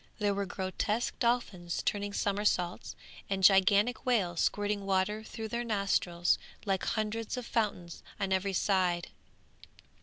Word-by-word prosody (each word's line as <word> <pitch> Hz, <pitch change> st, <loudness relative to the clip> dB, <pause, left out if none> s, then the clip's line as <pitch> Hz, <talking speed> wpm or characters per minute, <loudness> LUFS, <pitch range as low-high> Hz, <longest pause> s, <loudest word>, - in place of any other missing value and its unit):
There 205 Hz, -2 st, +1 dB
were 200 Hz, 0 st, -2 dB
grotesque 200 Hz, +5 st, -2 dB
dolphins 210 Hz, -8 st, 0 dB
turning 205 Hz, 0 st, -1 dB
somersaults, 200 Hz, -3 st, -1 dB, 0.3 s
and 195 Hz, -1 st, -1 dB
gigantic 200 Hz, +5 st, +5 dB
whales 200 Hz, -10 st, +1 dB
squirting 205 Hz, 0 st, 0 dB
water 195 Hz, +2 st, 0 dB
through 220 Hz, 0 st, -6 dB
their 235 Hz, +2 st, -2 dB
nostrils 195 Hz, -5 st, +1 dB, 0.3 s
like 195 Hz, -2 st, 0 dB
hundreds 220 Hz, +2 st, -2 dB
of 250 Hz, -, -4 dB
fountains 200 Hz, -8 st, -2 dB, 0.2 s
on 190 Hz, -1 st, 0 dB
every 190 Hz, +1 st, 0 dB
side. 180 Hz, -3 st, +1 dB
200 Hz, 125 wpm, -31 LUFS, 185-215 Hz, 0.3 s, gigantic